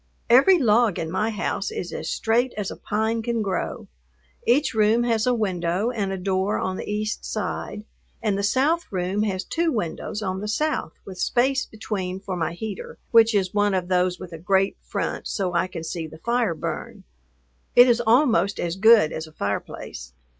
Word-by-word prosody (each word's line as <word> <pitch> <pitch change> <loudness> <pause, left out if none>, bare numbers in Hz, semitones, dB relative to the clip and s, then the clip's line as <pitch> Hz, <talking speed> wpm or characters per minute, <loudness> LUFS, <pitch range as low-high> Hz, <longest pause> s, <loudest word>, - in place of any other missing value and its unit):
Every 275 +10 +7
log 230 - +3
in 160 -1 -3
my 210 +5 0
house 215 - -2
is 445 0 -5
as - - -4
straight 240 +3 +1
as 205 -2 -3
a - - -6
pine 220 +2 -1
can 230 -1 -1
grow. 195 -2 -3 0.6
Each 285 +5 +3
room 220 +2 +3
has 230 -1 +1
a 250 - +4
window 190 0 0
and 205 -5 -2
a 190 - -2
door 190 +2 0
on 185 - -2
the - - -5
east 215 +1 -2
side, 210 - -4 0.3
and 210 -3 0
the 200 - -1
south 280 +11 +1
room 185 +2 -1
has 195 -3 -1
two 330 - 0
windows 210 - -3
on 190 -1 -2
the 210 - -4
south 300 - -1
with 185 -2 -9
space 265 +2 +1
between 190 -4 -4
for 195 -1 -5
my 170 -1 -2
heater, 205 +2 -6
which 230 -1 +6
is 190 -2 +1
one 205 -1 +2
of 180 -1 -2
those 180 0 +1
with 180 -2 -9
a 165 - -7
grate 190 +3 +1
front - - -3
so 185 -3 -2
I 175 +1 +1
can 170 -3 -7
see 165 0 -4
the 160 - -12
fire 235 -1 0
burn. - - -5 0.7
It 245 +1 +9
is 240 -1 +3
almost 225 - +3
as 170 +1 -2
good 220 -5 +6
as 160 0 -5
a - - -14
fireplace. 100 - -5
205 Hz, 190 wpm, -24 LUFS, 185-230 Hz, 0.7 s, It